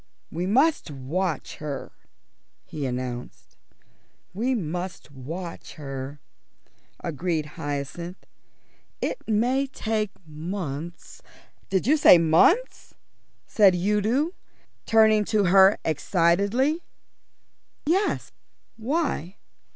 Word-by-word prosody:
"We 175 +3 -2
must 275 - +2
watch 150 +4 -3
her," 150 -2 -6 0.7
he 145 -3 -4
announced. 125 -1 -6 0.8
"We 245 +7 0
must 175 -4 -5
watch 165 +7 -7
her," 135 -1 -6 0.8
agreed 165 -1 -2
Hyacinth. 145 +5 -5 0.7
"It - - -2
may 245 +6 +1
take 220 -5 -2 0.2
months 160 0 -6 0.2
" - - -36
"Did 190 0 +1
you 300 +6 +4
say 275 - +8
months?" 170 - +3 0.5
said 200 -4 +5
Udo, 210 - +1 0.6
turning 220 -1 +5
to 215 -1 +2
her 190 +2 +6
excitedly. 200 - +2 1.0
"Yes, 375 +7 0 0.5
why?" 230 - -2
185 Hz, 90 wpm, -25 LUFS, 155-225 Hz, 1.0 s, say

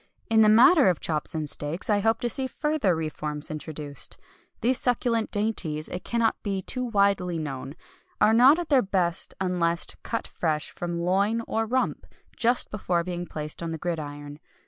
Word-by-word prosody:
In 220 -1 +5
the 215 - +6
matter 255 - +7
of 175 - 0
chops 155 0 -3
and 155 -1 -2
steaks 150 +5 -3
I 210 -1 +3
hope 225 +2 +1
to 240 - 0
see 260 +3 -2
further 300 - 0
reforms 155 -1 -3
introduced. 150 -2 -3 0.4
These 250 +3 +2
succulent 240 -2 0
dainties, 190 -8 -1
it 180 - -5
cannot 230 -1 0
be 195 -2 -3
too 255 +5 -1
widely 200 -6 +1
known, 135 -2 -5 0.4
are 220 - +5
not 255 +7 +7
at 350 -2 -4
their 275 -4 +5
best 185 -4 0
unless 175 -2 +1 0.2
cut 230 - -3
fresh 155 -3 -2
from 175 -1 -4
loin 200 +6 +1
or 225 0 -1
rump, 255 +3 -1 0.3
just 240 +1 +1
before 180 -4 -1
being 175 0 -5
placed 155 +1 -6
on 170 - -3
the 165 - -4
gridiron. 145 -3 -5
185 Hz, 170 wpm, -26 LUFS, 160-225 Hz, 0.4 s, matter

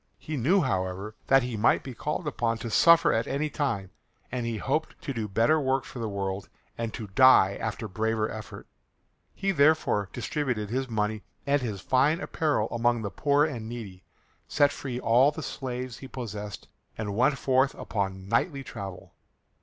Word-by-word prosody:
He 155 - -6
knew, 165 +9 +3
however, 95 -3 -2
that 135 -1 +5
he 125 -2 -3
might 105 +2 +3
be 130 - -7
called 150 +7 -3
upon 115 -5 0
to 115 0 -6
suffer 170 +7 +6
at 115 - 0
any 145 +2 -1
time, 115 -11 -2 0.4
and 125 -2 -2
he 115 -1 -2
hoped 155 +8 -2
to 140 - -3
do 110 -3 -3
better 115 +11 +3
work 135 -1 +1
for 125 - -9
the 115 -2 -2
world 100 -1 -3 0.3
and 115 -1 -3
to 110 - -5
die 100 -1 +6
after 110 0 -3
braver 110 +2 0
effort. 110 -1 -8 0.7
He 195 0 0
therefore 145 - +3
distributed 120 -5 -2
his 130 +1 -1
money 105 -1 -1 0.2
and 140 0 +2
his 105 -6 -4
fine 140 - +2
apparel 150 - 0
among 120 0 +1
the 100 - -3
poor 145 +3 +3
and 120 -8 -5
needy, 100 -6 -8 0.4
set 145 -1 +3
free 130 -3 -5
all 125 +4 +5
the 150 +1 -6
slaves 125 -4 -5
he 135 - -9
possessed, 105 -7 -6 0.3
and 105 -2 -3
went 135 +5 +3
forth 130 +1 +2
upon 95 -2 -3
knightly 135 - 0
travel. 100 -7 -8
120 Hz, 175 wpm, -27 LUFS, 105-140 Hz, 0.7 s, suffer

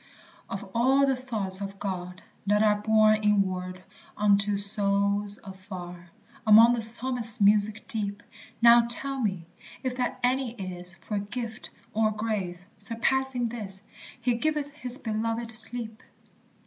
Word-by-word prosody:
Of - - -6
all 265 +4 +3
the 270 -1 +1
thoughts 215 -7 -2
of 195 0 -6
God 180 -2 -6 0.2
that 210 +1 +3
are 210 -1 +2
Borne 215 0 +4
inward 185 -3 0 0.3
unto 205 0 +2
souls 200 0 +1
afar, 185 -3 -10 0.4
Among 225 +3 +8
the 235 - -1
Psalmist's 230 0 +4
music 210 +1 +2
deep, 205 -2 -4 0.4
Now 235 0 +7
tell 275 +3 -3
me 190 -8 -2 0.4
if 255 -1 -3
that 250 -1 -2
any 255 -1 0
is, 180 -4 -6
For 200 +4 -4
gift 220 +2 -6 0.2
or 220 0 +2
grace, 205 -5 -4
surpassing 250 +1 -1
this, 205 -4 -4 0.4
"He 240 -1 0
giveth 300 +2 -1
his 255 -3 +2
belovèd 230 0 -3
sleep 225 -1 -2
215 Hz, 130 wpm, -27 LUFS, 200-240 Hz, 0.4 s, Among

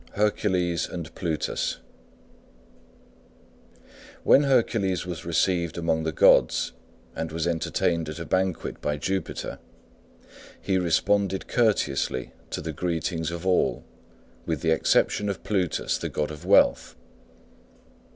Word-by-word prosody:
HERCULES 95 -5 0
AND 80 -2 -7
PLUTUS 80 -4 -2 2.5
When 140 - +6
Hercules 110 - +1
was 85 -3 -6
received 85 0 0
among 80 -1 0
the 80 - 0
gods - - +4 0.4
and 80 -1 -4
was 80 +1 -2
entertained 85 -1 0
at 75 - -6
a 85 - -5
banquet 95 -1 -1
by 75 0 -1
Jupiter, 95 +6 -3 1.0
he 95 -1 0
responded 95 +3 +1
courteously 75 - 0 0.2
to - - -4
the - - -5
greetings 80 -2 -2
of 85 +1 -6
all 95 -1 +1 0.6
with - - -1
the 80 - +1
exception 105 +5 +2
of 100 - -4
Plutus, 95 -5 -1
the - - -3
god 75 0 -2
of 75 -1 -9
wealth. - - +4
85 Hz, 115 wpm, -26 LUFS, 80-95 Hz, 2.5 s, When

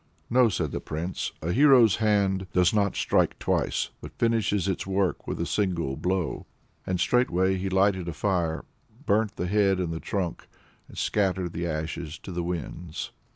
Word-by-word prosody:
"No," 125 +1 +6
replied 90 -9 0
the - - -3
Prince, 85 +4 -4
"a 85 - -1
hero's 125 -4 +6
hand 100 -3 +1
does 90 +1 +4
not 100 -2 +1
strike - - +1
twice, - - 0
but - - -10
finishes 110 -5 +1
its 95 -1 -2
work 95 -1 0
with - - -3
a 85 - 0
single 85 -9 -1
blow." 90 +2 -2 0.4
And 90 -1 -1
straightway 95 -4 +2
he 95 +1 -2
lighted 95 -1 +2
a 85 - -3
fire, 85 -1 -1 0.4
burnt 105 +1 +1
the 90 - -2
head 95 0 +2
and 85 -2 -1
the 80 - -4
trunk, 90 -3 -3 0.4
and - - -14
scattered 95 -4 0
the 85 +1 -2
ashes 80 0 -4
to - - -7
the 90 0 -2
winds. 85 -1 -5
95 Hz, 170 wpm, -26 LUFS, 85-100 Hz, 0.4 s, No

